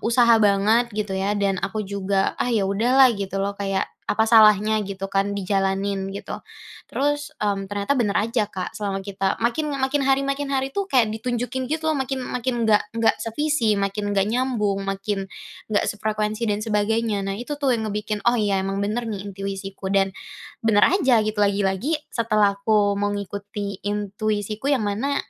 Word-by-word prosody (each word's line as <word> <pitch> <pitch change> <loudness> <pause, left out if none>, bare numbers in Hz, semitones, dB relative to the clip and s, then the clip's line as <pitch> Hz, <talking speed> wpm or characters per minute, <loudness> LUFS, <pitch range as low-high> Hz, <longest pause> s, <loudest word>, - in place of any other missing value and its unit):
usaha 235 -1 +4
banget 210 +4 +3
gitu, 210 -2 -2
ya, 195 +2 0
dan 195 -2 0
aku 215 -1 -3
juga, 195 0 0
ah, - - +1
ya, 220 -5 +1
udahlah 245 +6 +4
gitu, 200 -2 -4
loh, 195 +1 -1
kayak 195 -1 -1 0.2
apa 220 +1 +2
salahnya 215 -1 +6
gitu, 195 0 -5
kan, 195 +1 0
dijalanin 195 0 -1
gitu. 200 - -6 0.6
Terus, 290 +2 -1
mmm, 200 -2 0
ternyata 205 +7 0
bener 215 -5 +1
aja 230 0 0
Kak, 190 -3 -6
selama 200 -2 -2
kita 195 -1 -2
makin 290 +6 0
makin 270 +1 +1
hari 270 0 +3
makin 275 0 -2
hari, 270 0 0
tuh, 400 - +1
kayak 255 - +3
ditunjukin 245 +3 -3
gitu 315 0 -1
loh, 310 - +1
makin 265 -1 -2
makin 245 -2 -2
nggak 210 -1 +4 0.2
nggak 225 - +3
sevisi, 235 -1 0
makin 205 +1 -2
nggak 195 0 +1
nyambung, 220 -5 0
makin 195 0 -2 0.5
nggak 205 - +2
sefrekuensi 215 +1 -2
dan 210 -2 0
sebagainya. 215 -1 0
Nah, 195 - -2
itu, 290 +4 -4
tuh, 280 -3 +1
yang 220 -2 -1
ngebikin 210 0 -3
oh 240 - +3
iya 205 -3 +1
emang 195 +1 -2
bener, 225 +3 -2
nih, 200 -3 -5
intuisiku, 195 -1 -5
dan 195 0 +2 0.5
bener 215 -2 +4
aja 265 - +3
gitu 215 0 -2
lagi-lagi, 200 - +1 0.2
setelah 215 -3 +2
aku 205 -1 +3
mengikuti 205 0 -4
intuisiku 210 +3 -2
yang 265 -7 +2
mana, 225 +8 -1
210 Hz, 170 wpm, -23 LUFS, 200-240 Hz, 0.6 s, salahnya